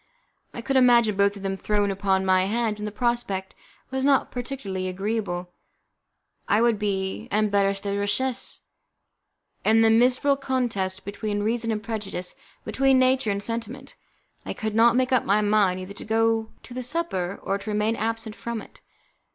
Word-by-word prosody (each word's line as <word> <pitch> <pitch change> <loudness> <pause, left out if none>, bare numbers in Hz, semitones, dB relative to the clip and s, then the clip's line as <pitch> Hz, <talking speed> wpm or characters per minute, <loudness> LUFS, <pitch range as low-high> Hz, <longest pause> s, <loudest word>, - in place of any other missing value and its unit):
I 235 - -7
could 270 +2 0
imagine 240 -4 +5
both 200 +1 +2
of 200 - -10
them 195 0 -1
thrown 205 0 0
upon 190 -1 0
my 185 0 +3
hands, 220 0 -1
and 210 - -3
the - - -5
prospect 210 -4 -2 0.4
was 265 0 -1
not 275 -1 +3
particularly 230 -7 -4
agreeable. 185 -2 -3 1.0
It 205 - +4
would 230 -2 +3
be 195 +1 -2
an 215 +1 +2
'embarras 200 -1 +2
de 200 -1 -2
richesse'. 245 +6 -1 1.0
In 225 +1 +4
this 225 0 +5
miserable 255 +4 +3
contest 230 -9 -2
between 205 +1 -3
reason 230 +1 0
and 210 -1 -3
prejudice, 200 -5 -4 0.3
between 270 -1 +3
nature 255 -3 +3
and 200 0 -1
sentiment, 235 +5 -5 0.5
I - - -4
could 220 -2 -4
not 230 +2 +5
make 255 +1 +1
up 255 -3 +3
my 205 +2 +2
mind 205 -3 +2
either 185 +2 -8
to - - -8
go 225 0 +1
to 245 - -11
the 255 - -4
supper 245 - -2
or 195 +1 -1
to 200 +2 -7
remain 210 +2 +1
absent 225 0 -3
from 235 -1 -4
it. - - -14
215 Hz, 170 wpm, -25 LUFS, 200-240 Hz, 1.0 s, imagine